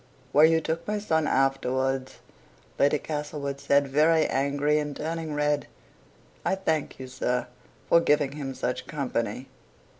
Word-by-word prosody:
"Where 150 +3 +7
you 160 0 +3
took 160 +1 -3
my 210 0 0
son 160 -7 0
afterwards," 135 0 0 0.6
Lady 145 +2 +4
Castlewood 145 -2 -4
said, 140 0 +2
very 155 +4 +3
angry, 145 +2 +1
and 145 -1 -4
turning 160 -1 -3
red. 150 0 0 0.8
"I - - +1
thank 160 -6 -1
you, 130 - -6
sir, 125 -1 -1 0.4
for 170 - +6
giving 145 -3 +2
him 140 -2 -5
such 125 +1 -3
company. 125 -4 -3
145 Hz, 140 wpm, -27 LUFS, 135-155 Hz, 0.8 s, Where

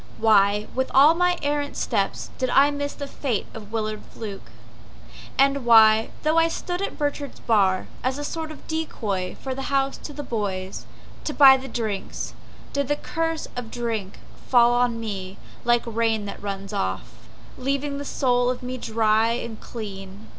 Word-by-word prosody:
Why, 210 -1 +4
with 260 0 -1
all 280 +4 +8
of 330 - -1
my 360 0 +3
errant 290 0 -1
steps 200 -5 -1
Did 255 -1 0
I 280 +3 +5
miss 285 0 -3
the 285 - -6
fate 265 -6 -2
of 215 -2 -10
Willard 215 -1 -2
Fluke? 205 -4 -8 0.9
And 275 0 +3
why, 220 -2 +6
though 310 +2 +3
I 330 - +4
stood 355 +2 -3
at 395 - -3
Burchard's 290 -1 -3
bar, 195 -4 +2 0.2
As 260 +1 0
a 290 - -4
sort 320 +1 -4
of 310 - -12
decoy 210 -13 -2
for 265 - -3
the 270 - -5
house 275 0 +1
to - - -8
the 290 0 -6
boys 195 -6 -4 0.4
To 300 - -2
buy 270 -2 +9
the 265 0 -5
drinks, 220 -5 -4 0.4
did 280 -1 0
the 290 - +1
curse 325 +1 -2
of 245 -2 -5
drink 225 -5 -3 0.3
Fall 240 -1 +5
on 245 -1 +1
me 195 -4 -5 0.3
like 240 0 +3
rain 225 -2 0
that 200 - -7
runs 195 -1 -5
off, 95 +2 -2 0.5
Leaving 280 +2 -1
the - - -4
soul 245 -3 +1
of 250 0 -3
me 255 0 -4
dry 220 0 +2
and 235 -2 -5
clean? 200 -2 -8
240 Hz, 175 wpm, -24 LUFS, 215-280 Hz, 0.9 s, buy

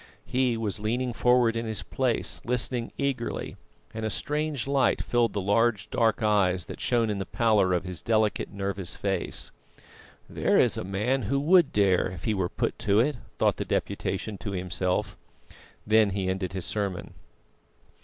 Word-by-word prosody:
He 125 -2 +1
was 110 -3 -2
leaning 120 +4 -1
forward 125 -1 +3
in 115 0 -2
his 110 -1 -2
place 130 -3 -1
listening 125 0 -1
eagerly, 135 -4 -2 0.4
and 110 - -5
a 110 - 0
strange 150 +2 -2
light 140 -1 +2
filled 120 -2 +1
the 100 - -1
large, 105 +2 +1
dark 115 -2 +1
eyes 95 -4 +2
that - - -9
shone 115 -3 +1
in 100 - -3
the 95 - -3
pallor 110 -6 +2
of 90 -1 +1
his 90 -3 -6
delicate, 110 -2 +1
nervous 100 -2 -3
face. 95 -3 -2 0.8
"There - - +1
is - - +4
a - - -3
man 105 +8 0
who 140 - +2
would 170 0 +5
dare, 100 -3 +3
if 90 -2 -8
he 110 - +1
were 95 -3 -1
put - - -2
to 105 -1 +2
it," 135 +3 +2 0.2
thought - - +2
the - - -2
Deputation 100 +1 -2
to 100 -3 -5
himself. 90 +3 -2 0.7
Then 110 0 +4
he 95 -1 -2
ended 95 -1 -2
his 95 -3 -3
sermon. 100 -4 -3
110 Hz, 170 wpm, -27 LUFS, 95-120 Hz, 0.8 s, would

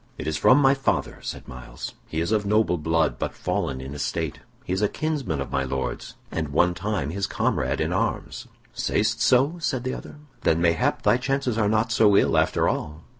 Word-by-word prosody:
"It - - -6
is 80 - -1
from 130 - +5
my 135 -1 +5
father," 135 -1 -1
said - - -6
Myles. 60 0 -8
"He 80 - -2
is 85 - -1
of 110 -2 +2
noble 100 -4 +2
blood, 80 +1 +1
but - - -3
fallen 65 -1 -2
in 65 +2 -7
estate. 75 - -3 0.3
He 90 - -2
is 95 - -1
a 105 - +4
kinsman 145 - -2
of 70 - -4
my 70 0 0
Lord's, 65 0 -4 0.2
and 80 -2 -2
one 90 +5 +3
time 100 -7 -2
his 100 +2 -2
comrade - - 0
in - - 0
arms." - - -2 0.3
"Sayst - - 0
so?" 135 +7 +3
said 130 -6 -1
the 130 - -2
other. - - -8 0.3
"Then 80 - +2
mayhap 85 -1 +1
thy - - +4
chances 135 -2 -1
are 110 -2 +2
not 110 +2 +1
so 105 -3 +5
ill, - - +3
after - - +2
all." 75 +1 -3
100 Hz, 205 wpm, -25 LUFS, 80-125 Hz, 0.3 s, from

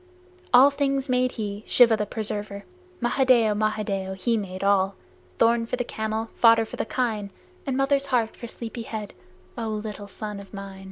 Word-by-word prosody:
All 260 +3 +8
things 275 -1 -1
made 255 0 +2
he 210 -2 -5
Shiva 235 -3 +6
the 210 -1 -2
Preserver. 205 -1 -4 0.4
Mahadeo! 240 -3 +3
Mahadeo! 205 -3 -1
He 230 +5 0
made 190 -3 -4
all, 195 -1 +2 0.4
Thorn 230 0 +3
for 250 - -1
the 245 - -2
camel, 220 -1 -3
fodder 230 -1 +5
for - - -8
the - - -2
kine, 220 -5 -1 0.4
And 265 -1 0
mother's 275 0 +2
heart 240 -4 0
for 235 - -8
sleepy 230 +1 -7
head, 215 -2 -6 0.5
O 225 - -2
little 210 -1 -5
son 210 +1 -6
of 200 +1 -11
mine! 195 -1 -8
220 Hz, 170 wpm, -25 LUFS, 205-245 Hz, 0.5 s, All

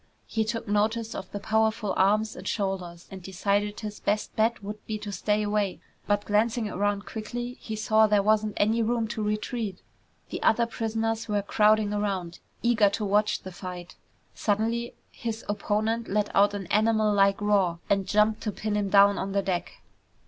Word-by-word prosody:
He 220 - -1
took 230 +1 -4
notice 215 +2 0
of - - -7
the 205 - -4
powerful 220 -1 +1
arms 210 +3 +2
and - - -8
shoulders, 185 -4 -3
and 190 -1 -8
decided 200 +3 -1
his 210 -1 -6
best 210 +1 -1
bet 220 0 +1
would 210 +1 -7
be 215 - -2
to 210 -1 -6
stay 210 +2 0
away, 205 -2 -1 0.3
but 205 0 +1
glancing 220 +2 +1
around 205 0 -1
quickly 240 +3 -5
he 220 - -5
saw 215 0 +4
there 210 -1 +3
wasn't 215 0 +2
any 220 +3 +2
room 230 0 0
to 220 0 -3
retreat. 210 -1 -3 0.5
The - - -4
other 235 +1 +3
prisoners 225 0 -2
were 205 -2 0
crowding 210 0 +3
around, 195 -4 -2 0.2
eager 230 -4 +4
to 210 +1 -3
watch 210 +1 +1
the 185 - -7
fight. 180 -1 -8 0.4
Suddenly 230 +3 -1 0.2
his 225 -1 -5
opponent 215 +2 -1
let 210 +1 -1
out 205 +1 +4
an 200 -2 -4
animal 215 0 +3
like 195 -1 +3
roar 200 -5 +2
and 195 -1 +1
jumped 210 +2 +2
to 215 - -2
pin 215 +1 -3
him 205 -1 0
down 200 0 +6
on 195 +1 -3
the 200 0 +1
deck. 180 -2 -3
210 Hz, 180 wpm, -27 LUFS, 200-220 Hz, 0.5 s, down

